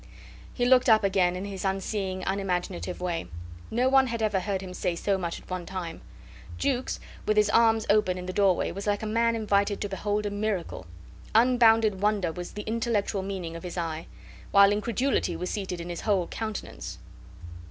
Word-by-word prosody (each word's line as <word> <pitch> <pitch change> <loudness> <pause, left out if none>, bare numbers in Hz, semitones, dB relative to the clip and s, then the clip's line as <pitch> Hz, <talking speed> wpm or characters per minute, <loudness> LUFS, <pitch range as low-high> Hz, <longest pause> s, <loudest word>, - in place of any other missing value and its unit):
He 245 - -1
looked 255 0 +5
up 220 -1 +6
again 185 -2 +2
in 185 +2 -4
his 195 -2 -6
unseeing, 195 -1 -2
unimaginative 180 -2 -2
way. 175 -2 -2 0.4
No 245 +3 +1
one 265 0 +5
had 230 -1 -3
ever 210 -3 +2
heard 190 0 -2
him 185 -1 -7
say 180 -1 -1
so 195 +3 0
much 175 -3 -3
at - - -19
one 185 -1 -4
time. 185 -3 -5 0.6
Jukes, 260 -2 -1 0.3
with 215 0 +2
his 210 - +4
arms 225 -1 +4
open 200 -3 +3
in 180 - -6
the 185 - -4
doorway, 195 -2 +2
was 195 +3 -6
like 205 +1 0
a - - -2
man 230 +2 +2
invited 205 -2 +1
to 205 - -1
behold 205 +2 -1
a 205 - -1
miracle. 205 - -3 0.5
Unbounded 225 -4 +5
wonder 205 -5 +1
was 175 +1 -7
the 210 - -5
intellectual 220 -3 -1
meaning 190 -4 -5
of 165 - -7
his 180 0 -7
eye, 165 -1 -3 0.4
while 200 0 +6
incredulity 210 -2 0
was 180 +2 -4
seated 190 -4 -3
in 170 +1 -6
his 175 - -5
whole 195 -4 +1
countenance. 220 +3 -6
200 Hz, 185 wpm, -27 LUFS, 180-220 Hz, 0.6 s, up